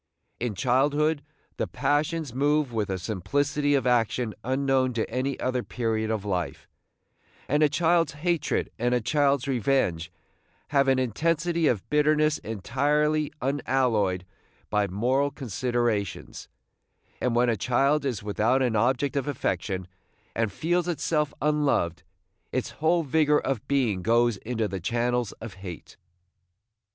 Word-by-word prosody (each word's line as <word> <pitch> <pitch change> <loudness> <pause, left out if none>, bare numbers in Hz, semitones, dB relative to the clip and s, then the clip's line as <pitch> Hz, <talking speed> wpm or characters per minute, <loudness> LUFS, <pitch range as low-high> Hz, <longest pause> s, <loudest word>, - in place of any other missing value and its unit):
In 115 -3 -2
childhood 145 - +2 0.4
the - - -1
passions 145 0 -1
move 145 0 +1
with 105 -3 -1
a 95 - -1
simplicity 140 - 0
of 135 - 0
action 120 -2 +1
unknown 130 0 +1
to 115 -1 -1
any 135 +2 -2
other 130 -1 0
period 110 -3 -2
of 110 -2 -2
life, 90 -8 -3 0.8
and 150 +2 +1
a 150 - +5
child's 165 +3 +2
hatred 170 +1 -1
and 120 +1 +2
a - - +2
child's 140 +2 +1
revenge 115 -10 0 0.6
have 140 -1 +3
an 135 -1 +4
intensity 165 - +1
of 110 -6 0
bitterness 150 0 +3
entirely 145 +8 0
unalloyed 125 -9 +1 0.5
by 105 -1 +2
moral 125 +9 +1
considerations; 120 - -2 0.7
and 125 -2 +1
when 120 +1 +3
a 115 - +2
child 135 +7 +2
is 125 -8 -2
without 110 +6 +1
an 120 -3 +1
object 130 +6 +1
of 140 0 -1
affection, 95 -8 -2 0.5
and 110 -2 0
feels 175 - 0
itself 155 -3 0
unloved, 145 - +1 0.5
its - - -2
whole 165 +2 +3
vigor 150 +1 +3
of 135 -1 -3
being 125 -9 +1
goes 115 +1 +2
into 115 0 -2
the 95 -1 -4
channels 120 +3 0
of 110 -3 -9
hate. 90 -5 -9
130 Hz, 135 wpm, -26 LUFS, 110-145 Hz, 0.8 s, a